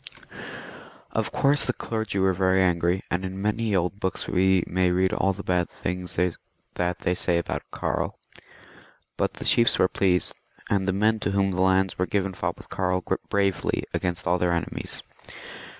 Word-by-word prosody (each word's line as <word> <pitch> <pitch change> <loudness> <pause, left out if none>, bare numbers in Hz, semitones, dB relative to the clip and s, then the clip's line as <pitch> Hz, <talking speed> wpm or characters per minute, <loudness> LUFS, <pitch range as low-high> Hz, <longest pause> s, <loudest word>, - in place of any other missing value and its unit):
Of - - -1
course 140 +1 +3
the 125 - 0
clergy 110 -4 -3
were 95 0 +3
very 95 +1 +2
angry, 90 0 +2
and 90 +1 0
in 95 0 -5
many 105 +1 0
old 90 +2 0
books 95 -3 -1
we 95 -1 +3
may 90 0 +1
read 95 +1 +2
all 95 - +2
the 100 +1 -7
bad 90 -1 +1
things 90 0 -5 0.6
that 90 0 -1
they 90 - +1
say 90 -1 +1
of 85 - -1 0.2
Karl; - - -2 1.0
but - - -1
the - - -7
chiefs 115 - +5
were 95 - +4
pleased, 90 -1 +1 0.4
and 100 -1 +1
the - - +3
men 110 +3 +2
to - - -1
whom 100 0 +1
the 95 0 -1
lands 95 0 +2
were 90 - +1
given 95 -2 0
fought - - -3
with - - -13
Karl 90 -1 0 0.3
bravely 100 -2 +1
against 90 -1 -2
all 90 +1 +2
their 90 0 +2
enemies. 85 - -3
95 Hz, 175 wpm, -25 LUFS, 90-100 Hz, 1.0 s, chiefs